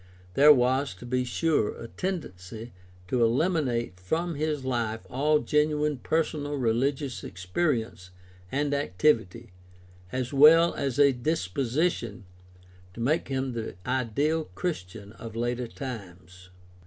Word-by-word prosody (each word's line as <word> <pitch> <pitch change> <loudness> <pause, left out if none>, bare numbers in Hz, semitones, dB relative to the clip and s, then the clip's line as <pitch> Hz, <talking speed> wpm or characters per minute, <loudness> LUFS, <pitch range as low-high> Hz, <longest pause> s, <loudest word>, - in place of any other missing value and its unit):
There 145 +6 +8
was, 130 -2 +2
to 110 - -11
be 125 +1 0
sure, 150 -3 0
a 115 - -7
tendency 115 - -5 0.3
to 120 +4 +2
eliminate 120 - +1
from 165 - -1
his 150 -2 -2
life 115 -3 -2
all 150 +4 +3
genuine 150 -1 +1
personal 150 -1 -1
religious 135 +2 0
experience 95 - -2 0.4
and 145 +1 0
activity, 115 -4 +1 0.6
as 130 +1 -3
well 160 +4 +7
as 135 -3 -2
a 140 -1 +6
disposition 120 - -1 0.7
to - - -9
make 140 +8 +1
him 130 -1 -2
the 115 -4 -5
ideal 135 +6 0
Christian 100 - -4
of 115 -1 -9
later 120 +1 -1
times. 90 -8 -9
130 Hz, 115 wpm, -27 LUFS, 115-150 Hz, 0.7 s, There